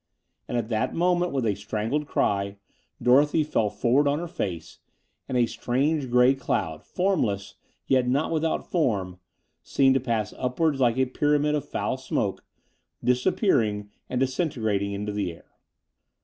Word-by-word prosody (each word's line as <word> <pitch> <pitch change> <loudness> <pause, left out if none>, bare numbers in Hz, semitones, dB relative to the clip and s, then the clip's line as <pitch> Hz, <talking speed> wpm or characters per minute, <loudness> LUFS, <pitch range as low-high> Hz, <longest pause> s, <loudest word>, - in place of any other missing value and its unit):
And 120 - -2
at 115 -1 -2
that 110 -2 -1
moment, 175 +1 +2
with 135 -4 -1
a 105 - +2
strangled 110 +8 -2
cry, 100 -4 0 0.4
Dorothy 145 +6 +4
fell 115 -8 0
forward 120 +7 +2
on 140 +1 +2
her 175 +2 -4
face, 90 - -5 0.5
and 130 - 0
a 120 - +4
strange 135 +5 -1
grey 125 +2 +5
cloud, 90 - -2
formless, 135 - -1 0.3
yet 130 -2 +2
not 140 +6 +1
without 160 0 -1
form, 100 - 0 0.4
seemed 135 +9 +3
to 135 - +2
pass 115 -5 -2
upwards 135 +3 0
like 120 -2 +3
a 130 - +3
pyramid 145 +3 +1
of 150 -2 -2
foul - - -2
smoke, - - -2 0.6
disappearing 125 - +1 0.2
and 125 - -1
disintegrating 115 - 0
into 105 +1 -3
the 100 -3 -2
air. 85 - -19
125 Hz, 150 wpm, -26 LUFS, 105-145 Hz, 0.6 s, grey